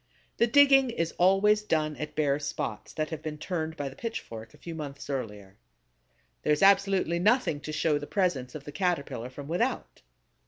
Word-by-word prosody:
The 235 - +4
digging 270 +1 +6
is 165 -8 -2
always 195 +4 +4
done 155 -7 0
at 150 - -6
bare 145 -2 +1
spots 140 -6 -4
that 155 +1 -3
have 160 -1 -5
been 155 -1 -5
turned 160 -1 -4
by 145 - -3
the 135 - -8
pitchfork 115 - -6
a - - -18
few 170 - -8
months 145 -3 -7
earlier. 105 -7 -6 0.8
There 150 - 0
is 150 - 0
absolutely 195 -3 +4
nothing 215 - +2
to 155 - -7
show 150 -1 +1
the 145 - -7
presence 155 -11 -1
of 150 - -7
the 145 - -8
Caterpillar 145 - -2
from 140 +2 -9
without. 205 - -2
155 Hz, 185 wpm, -28 LUFS, 145-195 Hz, 0.8 s, digging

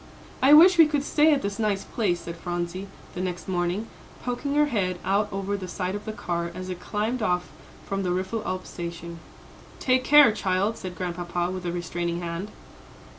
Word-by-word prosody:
"I 265 +2 +6
wish 350 +3 +8
we 325 - +9
could 295 -2 0
stay 300 +2 +4
at 290 - +2
this 200 +1 -3
nice 210 -3 0
place," 185 -7 -1
said 170 - -7
Phronsie, 175 +2 -4 0.3
the 180 - -4
next 180 -1 -4
morning, 180 +3 -1 0.4
poking 265 +3 -2
her 295 0 +5
head 190 -9 -1
out 205 +2 +2
over 195 +1 -2
the 190 -2 -5
side 180 +1 -3
of 205 +1 -5
the 220 - -3
car, 170 -4 -3
as 185 0 -6
it 180 -1 -5
climbed 220 +6 -2
off 180 -3 0 0.3
from 195 0 -2
the 185 - -1
Riffelalp 185 0 -2
station. 170 -1 -7 0.6
"Take 255 0 +2
care, 295 -3 +8
child," 200 +1 0
said 185 -4 -7
Grandpapa, 175 0 -2
with 185 -1 -5
a - - -1
restraining 175 0 -3
hand. 170 +4 -4
185 Hz, 185 wpm, -26 LUFS, 175-220 Hz, 0.6 s, we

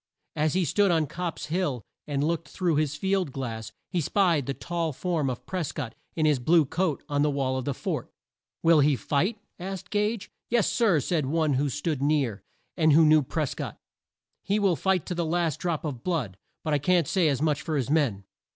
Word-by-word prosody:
As 155 0 +1
he 185 -1 +2
stood 200 +7 +3
on 165 -3 +3
Copp's 170 +3 -4
Hill 150 - -1 0.2
and 145 -1 -1
looked 165 0 -1
through 175 -5 0
his 150 -1 0
field 190 -1 0
glass, 115 -5 -5 0.2
he 180 -3 +1
spied 170 -5 +2
the 140 - -1
tall 170 -3 -2
form 160 -2 -1
of 125 - -5
Pres 185 -5 -3
cott, 125 -7 -5 0.2
in 155 - +1
his 150 -4 +3
blue 160 +5 +4
coat, 160 +1 -1
on 145 0 0
the 150 - +3
wall 135 -2 0
of 130 -1 -3
the 140 - -1
fort. - - -3 0.5
"Will 165 -1 +6
he 145 0 +4
fight?" 175 - 0 0.2
asked 190 +1 -6
Gage, 210 0 -1 0.2
"Yes, 235 -3 +3
sir," 215 - +3
said 155 -2 0
one 155 0 +1
who 140 +2 +1
stood 145 0 -2
near, 140 -8 +1 0.3
and 155 -2 +4
who 160 +2 +7
knew 155 0 +6
Pres 150 +1 -2
cott. - - -6 0.6
"He 200 - 0
will 195 -4 +3
fight 185 +3 +1
to - - -3
the 170 0 -1
last 165 -2 0
drop 170 -3 -2
of 130 -6 -5
blood; 145 - -1 0.3
but 155 - -1
I 145 - +3
can't 170 +1 +2
say 185 -4 +2
as 140 -4 +1
much 150 -1 +1
for 155 -3 -2
his 135 0 -1
men." 135 -11 +1
155 Hz, 210 wpm, -27 LUFS, 140-175 Hz, 0.6 s, who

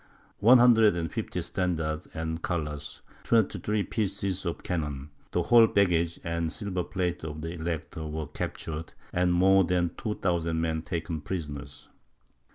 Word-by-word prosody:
One 120 +5 +8
hundred 115 -5 +6
and 80 -3 -2
fifty - - -3
standards 80 -3 -2
and 80 0 -4
colours, 75 -5 -4 0.2
twenty 110 -3 +2
three 105 +3 0
pieces 95 -3 -2
of 85 - -4
cannon, 75 -4 -3 0.2
the - - 0
whole 115 -1 +7
baggage 85 -5 +2
and 85 -1 -1
silver 95 -4 -2
plate 90 -3 -2
of 75 -1 -5
the 80 +2 -4
Elector, 80 -1 -4
were 75 0 -4
captured, 80 +3 -5 0.2
and 90 0 +2
more 95 +2 +5
than 85 -1 +1
2000 85 -6 -1
men 80 -1 0
taken 85 -2 -4
prisoners. 70 -5 -6
85 Hz, 145 wpm, -28 LUFS, 80-95 Hz, 0.2 s, One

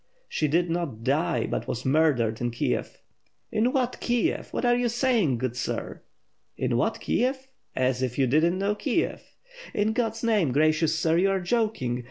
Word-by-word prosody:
"She 155 - 0
did 170 +4 +2
not 165 -10 -3
die, 155 +6 +1
but - - -3
was 120 - -4
murdered 130 -6 +2
in 120 - 0
Kiev." 120 - -3 0.5
"In 230 +4 +2
what 255 -3 -1
Kiev? 240 -2 0
What - - -2
are 240 0 +4
you 245 0 +1
saying, 230 - +1
good 125 0 -3
sir?" 125 - -4 0.6
"In - - 0
what - - 0
Kiev? 265 +2 -1 0.3
As 130 0 +1
if 125 -2 -2
you 135 - +3
did 140 +5 +3
not 170 +1 +3
know 200 +2 0
Kiev!" 275 +9 -1 0.5
"In 210 +1 +1
God's 225 -1 -2
name, 210 - +2
gracious 155 +2 +2
sir, 160 0 +2
you 195 +2 +3
are 195 0 +1
joking! 180 - -1
170 Hz, 180 wpm, -26 LUFS, -, 0.6 s, are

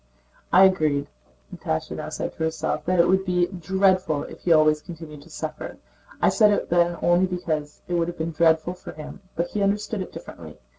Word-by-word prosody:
"I 185 +2 +7
agreed," 155 -7 +3 0.5
Natásha 80 - -3
now - - -5
said - - -4
to - - -27
herself, 160 - -2
"that 185 0 +1
it 170 - +5
would 190 +1 +3
be 180 -2 +2
dreadful 185 -3 +1
if - - -10
he 175 - -1
always 155 -1 +5
continued 160 -4 -10
to 160 - -17
suffer. 155 -1 -6 0.4
I - - +4
said 215 -3 +5
it 205 - 0
then 175 0 +3
only 175 +2 +4
because 155 -5 -4
it 175 - -4
would 170 -1 +1
have 175 - -6
been 160 +1 -2
dreadful 160 +1 +2
for 180 - -10
him, 155 0 -10
but 170 +1 -1
he 210 - -2
understood 205 +1 0
it 185 - -6
differently. - - -10
175 Hz, 200 wpm, -24 LUFS, 155-185 Hz, 0.5 s, I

